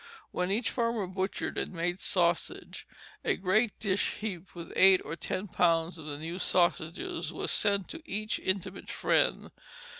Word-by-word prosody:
When 180 Hz, 0 st, -1 dB
each 220 Hz, +5 st, +1 dB
farmer 230 Hz, -4 st, 0 dB
butchered 185 Hz, +1 st, -2 dB
and -, -, -3 dB
made 175 Hz, +2 st, -1 dB
sausage, 175 Hz, -3 st, 0 dB, 0.4 s
a -, -, +2 dB
great 205 Hz, +4 st, +2 dB
dish 200 Hz, -2 st, +1 dB
heaped 195 Hz, -5 st, -6 dB
with 170 Hz, -1 st, -8 dB
eight 190 Hz, 0 st, +7 dB
or -, -, -3 dB
ten 185 Hz, +3 st, -3 dB
pounds 170 Hz, -1 st, +2 dB
of 155 Hz, -, -9 dB
the 145 Hz, -1 st, -3 dB
new 165 Hz, +4 st, -5 dB
sausages 180 Hz, -, 0 dB
was -, -, -2 dB
sent 200 Hz, -2 st, +2 dB
to 330 Hz, -, -7 dB
each 215 Hz, -7 st, -2 dB
intimate 190 Hz, -1 st, -2 dB
friend. -, -, +1 dB
185 Hz, 155 wpm, -30 LUFS, 170-210 Hz, 0.4 s, eight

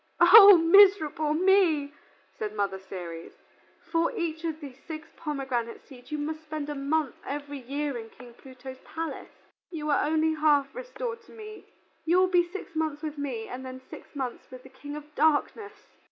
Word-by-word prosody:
"O 395 Hz, +2 st, +10 dB
miserable 330 Hz, -4 st, +4 dB
me!" 335 Hz, -5 st, +3 dB, 0.5 s
said 215 Hz, 0 st, -4 dB
Mother 200 Hz, -2 st, -2 dB
Ceres. 175 Hz, -3 st, -9 dB, 0.6 s
"For 330 Hz, 0 st, +1 dB
each 325 Hz, -1 st, -3 dB
of 320 Hz, -2 st, -3 dB
these 275 Hz, -4 st, -11 dB
six 310 Hz, -1 st, -7 dB
pomegranate 265 Hz, -7 st, -4 dB
seeds 250 Hz, 0 st, -15 dB
you 300 Hz, -, -2 dB
must 310 Hz, +2 st, -4 dB
spend 305 Hz, -2 st, -6 dB
a -, -, -3 dB
month 285 Hz, 0 st, -1 dB
every 285 Hz, 0 st, -6 dB
year 280 Hz, +2 st, -4 dB
in 225 Hz, 0 st, -10 dB
King 245 Hz, 0 st, -15 dB
Pluto's 260 Hz, +1 st, -12 dB
palace. 325 Hz, 0 st, -6 dB, 0.4 s
You 305 Hz, -3 st, -4 dB
are 285 Hz, -, +2 dB
only 315 Hz, +1 st, +1 dB
half 295 Hz, -3 st, +2 dB
restored -, -, -6 dB
to -, -, -18 dB
me; 430 Hz, -1 st, -11 dB, 0.4 s
you 340 Hz, +2 st, +2 dB
will 370 Hz, -, +5 dB
be 355 Hz, -1 st, +4 dB
six 390 Hz, -4 st, -8 dB
months 315 Hz, -1 st, -2 dB
with 305 Hz, -1 st, -5 dB
me 245 Hz, -6 st, -4 dB
and 255 Hz, +1 st, -7 dB
then 260 Hz, 0 st, -8 dB
six 260 Hz, -, -14 dB
months 260 Hz, -3 st, -5 dB
with 255 Hz, -1 st, -12 dB
the 265 Hz, -, -14 dB
King 285 Hz, +3 st, -9 dB
of 300 Hz, 0 st, -10 dB
Darkness!" 320 Hz, +8 st, 0 dB
300 Hz, 175 wpm, -27 LUFS, 265-330 Hz, 0.6 s, O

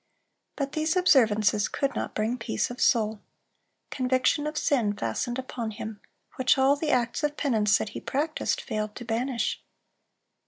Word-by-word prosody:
But 280 Hz, -1 st, -2 dB
these 315 Hz, +2 st, 0 dB
observances 215 Hz, -, +4 dB
could 275 Hz, -1 st, -1 dB
not -, -, -4 dB
bring 220 Hz, +3 st, 0 dB
peace 110 Hz, -, -1 dB
of 245 Hz, -, -7 dB
soul. 220 Hz, -2 st, +2 dB, 0.7 s
Conviction 260 Hz, +3 st, +1 dB
of 305 Hz, 0 st, -4 dB
sin 235 Hz, -8 st, +1 dB
fastened 180 Hz, -, -2 dB
upon 250 Hz, -3 st, -4 dB
him, 220 Hz, -1 st, -7 dB, 0.4 s
which 255 Hz, 0 st, +3 dB
all 270 Hz, +2 st, +4 dB
the 300 Hz, +1 st, -3 dB
acts 245 Hz, +2 st, +1 dB
of 295 Hz, 0 st, -1 dB
penance 215 Hz, -8 st, +3 dB
that 220 Hz, -, -3 dB
he -, -, -7 dB
practised, 305 Hz, +3 st, -1 dB
failed 215 Hz, -1 st, -4 dB
to 240 Hz, -, -8 dB
banish. 235 Hz, +2 st, -1 dB
245 Hz, 155 wpm, -27 LUFS, 215-280 Hz, 0.7 s, observances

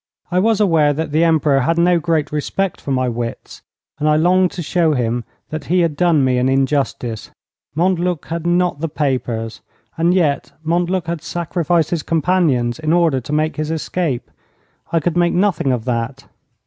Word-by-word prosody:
I 180 Hz, -, +2 dB
was 220 Hz, +2 st, +2 dB
aware 160 Hz, -7 st, +3 dB
that 160 Hz, +1 st, -3 dB
the 155 Hz, +3 st, +3 dB
Emperor 155 Hz, -4 st, +3 dB
had 165 Hz, +6 st, +1 dB
no 175 Hz, 0 st, +4 dB
great 160 Hz, -2 st, 0 dB
respect 170 Hz, +5 st, -2 dB
for -, -, -7 dB
my 130 Hz, -1 st, +1 dB
wits, 120 Hz, -1 st, -5 dB, 0.4 s
and 150 Hz, +1 st, +1 dB
I 150 Hz, -, +4 dB
longed 180 Hz, +3 st, +3 dB
to 175 Hz, -, -5 dB
show 160 Hz, 0 st, +1 dB
him 120 Hz, -2 st, -1 dB, 0.2 s
that 155 Hz, 0 st, -5 dB
he 180 Hz, +1 st, +2 dB
had 165 Hz, -3 st, 0 dB
done 165 Hz, -4 st, +3 dB
me 125 Hz, -1 st, +2 dB
an 125 Hz, +1 st, +1 dB
injustice. 135 Hz, -4 st, -1 dB, 0.5 s
Montluc 175 Hz, -1 st, 0 dB
had 170 Hz, 0 st, -4 dB
not 175 Hz, -3 st, +1 dB
the 165 Hz, +1 st, -2 dB
papers. 125 Hz, -6 st, -2 dB, 0.4 s
And 170 Hz, +2 st, +3 dB
yet 145 Hz, -5 st, 0 dB
Montluc 175 Hz, +2 st, 0 dB
had 170 Hz, -1 st, -3 dB
sacrificed 170 Hz, -1 st, -1 dB
his 170 Hz, -3 st, 0 dB
companions 155 Hz, -8 st, +1 dB
in 155 Hz, 0 st, 0 dB
order 165 Hz, -7 st, +2 dB
to 125 Hz, -, -8 dB
make 155 Hz, +2 st, 0 dB
his 155 Hz, 0 st, -2 dB
escape. 160 Hz, -4 st, -2 dB, 0.6 s
I 165 Hz, -, +2 dB
could 165 Hz, +2 st, -1 dB
make 175 Hz, 0 st, +3 dB
nothing 180 Hz, -7 st, +1 dB
of 125 Hz, -2 st, -2 dB
that. 125 Hz, +2 st, -3 dB
160 Hz, 180 wpm, -18 LUFS, 135-175 Hz, 0.6 s, no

